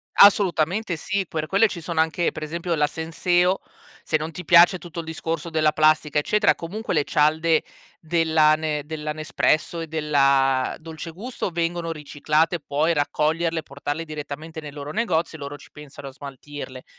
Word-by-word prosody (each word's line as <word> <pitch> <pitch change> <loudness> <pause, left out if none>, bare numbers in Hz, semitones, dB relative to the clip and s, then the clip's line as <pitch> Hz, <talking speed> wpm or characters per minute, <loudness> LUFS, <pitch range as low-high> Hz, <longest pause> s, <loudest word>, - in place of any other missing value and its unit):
Assolutamente 190 -1 +4
sì. 195 +4 -2
Per 155 -1 -3
quelle 200 +5 +4
ci 175 -4 -7
sono 165 -1 -3
anche, 160 +2 +1
per 155 - -7
esempio, 170 +2 -2
la 150 -1 +3
Senseo, 175 +4 +1 0.4
se 155 - +1
non 155 +2 -5
ti 180 +2 -8
piace 175 +3 +7
tutto 170 -1 -9
il 165 - -5
discorso 160 0 -4
della 155 -1 +2
plastica, 155 -1 +3
eccetera, 210 +7 +3
comunque 195 +5 -5
le 150 -3 +2
cialde 155 +2 +2 0.4
della 160 -2 +3
Ne 155 -2 -2
della 150 0 -4
Nespresso 155 +2 0
e 165 - -5
della 140 -4 +2
Dolce 160 +1 -8
Gusto 215 +3 -5
vengono 170 0 -2
riciclate, 155 +3 0
puoi 150 +4 0
raccoglierle 160 +3 0
e - - -7
portarle 145 +2 -5
direttamente 155 +1 -7
nei 145 -2 -9
loro 145 0 -7
negozi 170 -6 -1
e 160 - -10
loro 140 +1 -6
ci - - -17
pensano 140 -2 -10
a - - -12
smaltirle. 140 -1 -9
160 Hz, 170 wpm, -23 LUFS, 150-170 Hz, 0.4 s, piace